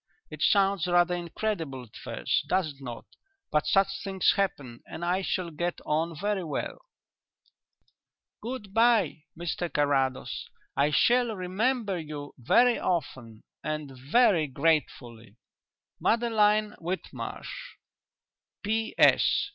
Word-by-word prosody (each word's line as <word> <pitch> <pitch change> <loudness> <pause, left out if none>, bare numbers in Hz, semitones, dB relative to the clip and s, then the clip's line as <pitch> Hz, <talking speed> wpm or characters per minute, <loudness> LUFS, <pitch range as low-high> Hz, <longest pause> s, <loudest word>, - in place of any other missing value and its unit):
It - - -9
sounds 195 -3 +3
rather 175 0 +3
incredible 170 -6 -3
at 115 - -17
first, - - -2
does 185 -4 +1
it 140 - -21
not, 120 -3 -7 0.5
but 150 0 +1
such 195 0 +2
things 195 -1 +2
happen, 140 -12 -2
and 170 - -6
I 180 +2 +1
shall 185 -2 -2
get 175 +3 -3
on 160 +2 0
very 205 -1 -1
well. 155 -3 -4 1.6
"Good 220 -4 -6
bye, 225 -9 +3
Mr 175 0 -3
Carrados; 135 -3 0 0.3
I 140 +2 +3
shall 240 - +3
remember 200 +2 -1
you 150 -2 -7
very 240 - +4
often 130 -10 -3 0.2
and 155 -2 -3
very 160 - +3
gratefully. 125 -7 -1 0.6
"MADELINE 215 -2 +2
WHITMARSH. 190 - -6 0.9
"_P.S. 220 - +3
175 Hz, 110 wpm, -28 LUFS, 145-210 Hz, 1.6 s, very